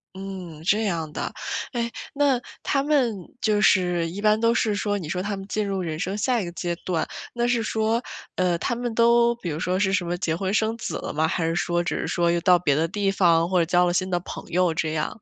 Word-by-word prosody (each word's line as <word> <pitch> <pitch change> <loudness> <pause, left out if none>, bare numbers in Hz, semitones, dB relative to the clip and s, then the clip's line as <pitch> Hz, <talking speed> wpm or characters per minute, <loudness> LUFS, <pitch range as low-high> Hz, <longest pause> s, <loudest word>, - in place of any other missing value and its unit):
嗯， 185 -5 -7
这 210 +6 +2
样 165 -6 -2
的。 - - -3 0.4
哎， 235 -1 -1 0.2
那 275 -3 +2 0.2
他 275 - +1
们 280 -6 +2 0.3
就 210 -1 +2
是 180 -4 +3
一 195 +4 -6
般 215 0 +4
都 230 +1 +3
是 215 -2 +1
说， 205 0 -1
你 175 -6 -6
说 180 +1 -1
他 200 +1 -2
们 195 - -7
进 210 0 -1
入 195 -1 -1
人 160 -2 -4
生 190 +4 -2
下 240 +2 +1
一 - - -3
个 175 - -6
阶 175 -1 -2
段， 170 -4 -2 0.3
那 240 0 0
是 240 -1 +2
说， 220 +1 0 0.3
呃， 180 -2 +1
他 205 - -1
们 240 -1 -3
都 235 +1 +4
比 195 -8 -6
如 155 +1 -3
说 185 +1 0
是 195 -1 +2
什 180 -3 +1
么 175 +1 -2
结 165 -3 -1
婚 190 +2 -2
生 220 +1 +1
子 - - -4
了 - - -5
吗？ 160 +2 +2
还 165 0 -1
是 165 0 0
说 175 0 0
只 170 - -2
是 - - -2
说 170 -1 +1
又 170 - +1
到 180 0 +6
别 160 -5 +1
的 160 +3 +1
地 195 +2 0
方 170 -3 +3
或 185 -1 +3
者 165 - +3
交 180 +1 +3
了 175 - +1
新 185 +1 0
的 175 - +1
朋 175 - -8
友 175 0 +2
这 155 0 -1
样？ 160 +7 -3
185 Hz, 270 characters per minute, -24 LUFS, 170-220 Hz, 0.4 s, 到